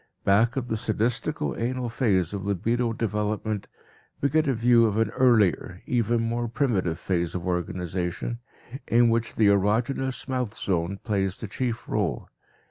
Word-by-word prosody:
Back 115 +5 +3
of 125 -2 -2
the 110 - -1
sadistico 110 - -1
anal 125 +1 -2
phase 100 - +1
of 100 -2 -4
libido 115 +5 0
development, 105 -1 -2 0.5
we 140 - +1
get 155 +2 +2
a 135 - +3
view 115 0 +5
of 105 -1 -1
an 115 -1 +1
earlier, 110 -7 +2
even 120 -1 +1
more 120 +1 -1
primitive 110 - 0
phase 85 -2 -1
of 90 0 -4
organization, 90 +4 -3 0.5
in 120 0 +4
which 115 0 -1
the 110 - +3
erogenous 115 +7 0
mouth 125 -5 -2
zone 90 +1 -1
plays 95 -3 -1
the 110 - -5
chief 120 +3 -3
role. - - -2
110 Hz, 150 wpm, -26 LUFS, 95-120 Hz, 0.5 s, view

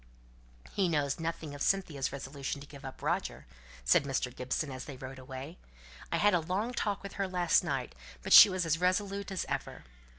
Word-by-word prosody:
"He 190 -3 +1
knows 145 -3 0
nothing 165 -2 -4
of 145 - -9
Cynthia's 160 -9 0
resolution 140 +1 -5
to 140 - -10
give 140 -1 -13
up 135 -1 -9
Roger," - - -2 0.4
said 65 - +5
Mr. 135 -2 -2
Gibson 130 +3 -2
as 130 0 -7
they 140 - -8
rode 130 +1 -8
away. 130 +5 -8 0.5
"I - - +1
had 205 -1 +4
a 175 - +4
long 190 +9 -2
talk 205 -5 -2
with 200 - -7
her 195 - +1
last 180 -2 +2
night, - - -3 0.3
but - - +1
she - - +12
was 185 -2 -1
as 165 0 +1
resolute 195 +2 0
as 190 -2 -3
ever. - - -4
160 Hz, 195 wpm, -31 LUFS, 135-185 Hz, 0.5 s, she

